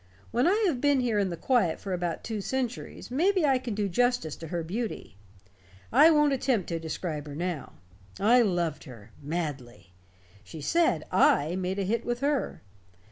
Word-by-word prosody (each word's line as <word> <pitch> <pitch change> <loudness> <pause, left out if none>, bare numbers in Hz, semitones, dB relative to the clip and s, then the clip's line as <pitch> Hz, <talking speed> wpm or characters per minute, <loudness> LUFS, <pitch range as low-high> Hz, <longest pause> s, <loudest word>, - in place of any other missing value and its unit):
When 245 +6 +2
I 420 +5 +3
have 290 -10 0
been 285 -2 +3
here 230 -4 +1
in 195 -2 +1
the 170 - -5
quiet 205 -4 +1
for 195 - -4
about 175 -2 -3
two 220 -2 -4
centuries, 250 +1 -4
maybe 360 +5 +2
I 270 -3 +3
can 240 -4 -5
do 205 -1 0
justice 245 -5 0
to 165 - -8
her 170 +1 -3
beauty. 210 - -5 0.8
I 320 - +7
won't 295 -3 +4
attempt 255 -7 0
to 165 -1 -2
describe 160 -1 -4
her 145 - -7
now. 170 -3 -4 0.5
I 235 +5 +5
loved 175 -7 -1
her 115 -6 -12
madly. 140 - -5 0.5
She 105 - -10
said 335 - +1
I 175 - +3
made 185 +1 -2
a 200 - 0
hit 225 +5 -1
with 240 +1 -3
her. 285 - -1
200 Hz, 180 wpm, -28 LUFS, 165-255 Hz, 0.8 s, I